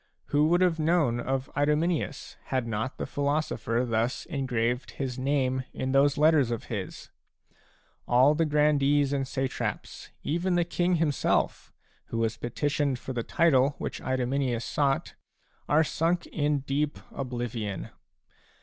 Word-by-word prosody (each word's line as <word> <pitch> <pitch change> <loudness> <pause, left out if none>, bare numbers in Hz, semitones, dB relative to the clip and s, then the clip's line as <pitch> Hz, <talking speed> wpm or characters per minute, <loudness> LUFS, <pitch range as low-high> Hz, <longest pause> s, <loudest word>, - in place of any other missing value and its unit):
Who 150 +1 +3
would 175 +2 +3
have 175 -3 +2
known 155 -7 +2
of 130 +2 -2
Idomeneus, 150 +3 0
had 130 -2 -1
not 115 +3 -3
the - - -3
philo 145 +1 0
sopher 115 -4 -1
thus 115 +2 -1
engraved 125 -5 -1
his 130 -2 -3
name 130 -1 0
in 130 - -2
those 140 +1 +4
letters 150 -4 +4
of 115 -2 -3
his? 100 -4 -6 1.0
All 130 +4 +5
the 160 +1 +1
grandees 145 -1 +3
and 135 -2 -1
satraps, 135 0 -4
even 175 +4 0
the 175 -1 +2
king 175 +1 +1
himself, 155 -4 0 0.3
who 115 - -5
was 115 -1 0
petitioned 140 +3 -1
for 130 - -6
the 120 - -1
title 140 0 +3
which - - -5
Idomeneus 130 -1 -1
sought, 140 -2 0 0.6
are 155 +3 +5
sunk 165 +3 0
in 145 -2 0
deep 145 +2 -1
oblivion. 120 -6 -4
140 Hz, 140 wpm, -28 LUFS, 125-150 Hz, 1.0 s, All